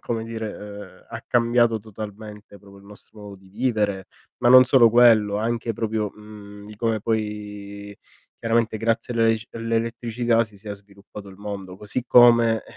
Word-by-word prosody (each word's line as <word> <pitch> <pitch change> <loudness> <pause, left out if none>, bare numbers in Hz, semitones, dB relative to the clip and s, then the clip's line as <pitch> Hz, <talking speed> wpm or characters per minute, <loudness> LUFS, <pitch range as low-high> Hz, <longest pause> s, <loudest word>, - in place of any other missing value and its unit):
come 115 -1 -3
dire, 110 -2 -6 0.5
ehm, - - -33
ha 115 -1 -7
cambiato 120 -1 +2
totalmente 105 0 -10
proprio 100 -1 -16
il 100 - -19
nostro 105 +1 -15
modo 105 -1 -10
di 95 0 -19
vivere, 105 -3 -2 0.3
ma 120 - +2
non 130 +1 +9
solo 125 -3 +5
quello, 110 -3 +4
anche 115 +1 -2
proprio, 110 -1 -3
mhmm, 105 -1 -13
di 105 - -12
come 115 0 -1
poi, 105 -2 -5 0.5
chiaramente, 115 -1 0
grazie 115 +2 -1
all'elesc 115 -1 0
all'elettricità 115 0 -1
si 110 -1 -13
sia 105 +1 -8
sviluppato 100 0 -13
il 95 - -13
mondo. 100 -2 -8
Così 105 +5 -4
come, 115 -2 +5
110 Hz, 155 wpm, -23 LUFS, 105-115 Hz, 0.5 s, non